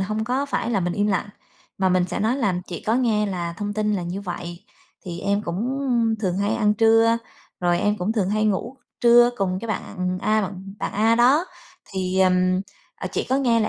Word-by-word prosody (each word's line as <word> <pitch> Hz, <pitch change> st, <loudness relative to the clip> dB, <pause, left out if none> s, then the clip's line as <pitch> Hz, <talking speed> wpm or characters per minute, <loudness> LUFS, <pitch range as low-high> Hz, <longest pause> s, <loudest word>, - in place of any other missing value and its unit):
hông 215 Hz, +3 st, -2 dB
có 260 Hz, +4 st, -1 dB
phải 240 Hz, -4 st, -2 dB
là 200 Hz, -, +1 dB
mình 175 Hz, 0 st, -1 dB
im 205 Hz, +2 st, 0 dB
lặng. 205 Hz, 0 st, 0 dB, 0.5 s
Mà 190 Hz, -1 st, +2 dB
mình 180 Hz, -1 st, +3 dB
sẽ -, -, -3 dB
nói 225 Hz, +4 st, +1 dB
là 205 Hz, -9 st, +1 dB
chị 170 Hz, -, -6 dB
có 220 Hz, -, +2 dB
nghe 225 Hz, -4 st, +2 dB
là 175 Hz, -3 st, -3 dB
thông 205 Hz, 0 st, -3 dB
tin 210 Hz, 0 st, 0 dB
là 185 Hz, -, -2 dB
như 180 Hz, +3 st, -4 dB
vậy, 175 Hz, -2 st, -7 dB, 0.4 s
thì 175 Hz, -1 st, -6 dB
em 200 Hz, +1 st, 0 dB
cũng, 225 Hz, +11 st, -2 dB
ưm, 235 Hz, -5 st, +1 dB
thường 185 Hz, -2 st, -1 dB
hay 205 Hz, +1 st, +1 dB
ăn 210 Hz, -1 st, +2 dB
trưa, 225 Hz, +1 st, +4 dB, 0.4 s
rồi 175 Hz, -1 st, +2 dB
em 210 Hz, 0 st, +1 dB
cũng 190 Hz, +4 st, -1 dB
thường 200 Hz, -4 st, 0 dB
hay 215 Hz, +1 st, +1 dB
ngủ 215 Hz, +5 st, -1 dB, 0.2 s
trưa 240 Hz, 0 st, +6 dB
cùng 185 Hz, -2 st, -1 dB
cái 230 Hz, -, -7 dB
bạn, 215 Hz, -, -2 dB
ừm, 185 Hz, 0 st, -1 dB
A 215 Hz, +2 st, +1 dB, 0.4 s
bạn -, -, -3 dB
A 220 Hz, +2 st, +3 dB
đó. 260 Hz, +8 st, +4 dB, 0.5 s
Thì, 185 Hz, 0 st, 0 dB
ừm, 185 Hz, 0 st, +3 dB, 0.4 s
à, -, -, -5 dB
chị -, -, -2 dB
có 260 Hz, -, +3 dB
nghe 240 Hz, -4 st, +2 dB
là 215 Hz, -, +1 dB
210 Hz, 225 wpm, -23 LUFS, 185-230 Hz, 0.5 s, trưa